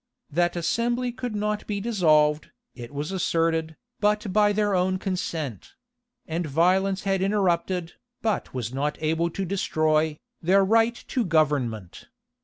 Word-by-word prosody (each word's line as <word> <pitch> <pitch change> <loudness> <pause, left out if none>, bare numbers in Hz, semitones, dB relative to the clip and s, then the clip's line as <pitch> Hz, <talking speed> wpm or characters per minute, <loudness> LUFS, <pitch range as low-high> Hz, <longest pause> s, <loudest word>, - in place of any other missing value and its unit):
That 175 +3 +1
assembly 240 +8 0
could 245 -2 -5
not 210 0 -2
be 205 -1 -2
dissolved, 155 -9 +2 0.2
it 120 -1 -9
was 145 +4 -4
asserted, 165 -3 0 0.2
but 210 -1 +1
by 210 0 +4
their 205 0 +1
own 185 0 +1
consent; 165 - -4 0.5
and 165 +1 -2
violence 185 +6 +2
had 195 -1 0
interrupted, 185 -3 0 0.3
but 220 -2 -1
was 125 -2 -4
not 145 +2 -1
able 160 +2 0
to 190 +3 -4
destroy, 155 -4 +1 0.2
their 190 +3 +4
right 225 +3 +3
to 255 - 0
government. 145 - 0
180 Hz, 135 wpm, -25 LUFS, 155-205 Hz, 0.5 s, by